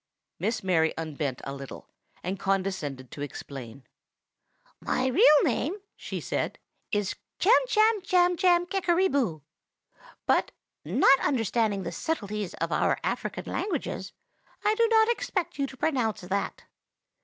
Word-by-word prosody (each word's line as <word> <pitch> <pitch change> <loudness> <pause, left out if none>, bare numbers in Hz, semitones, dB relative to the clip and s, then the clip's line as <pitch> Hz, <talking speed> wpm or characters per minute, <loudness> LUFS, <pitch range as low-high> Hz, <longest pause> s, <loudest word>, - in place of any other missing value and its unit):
Miss 220 -1 -1
Mary 165 -4 +2
unbent 150 -5 -3
a 135 - -5
little, 140 -1 -9 0.4
and 190 +2 -3
condescended 185 -10 -2
to 145 - -8
explain. 135 -3 -7 1.0
"My 255 - -1
real 285 +3 +6
name," 325 +8 0 0.2
she - - -5
said, - - -2 0.3
"is 205 -2 0 0.3
Chamchamchamchamkickeryboo; 360 - +3 0.8
but, - - +2 0.3
not 255 - +5
understanding 225 -5 0
the 170 - -4
subtleties 210 - -3
of - - -3
our - - +2
African - - -3
languages, 405 - -3 0.5
I 420 - +4
do 460 +1 +3
not 445 -1 +5
expect 370 -10 -2
you 275 - +1
to 265 - -12
pronounce 245 -8 0
that. 190 +2 -3
225 Hz, 115 wpm, -27 LUFS, -, 1.0 s, real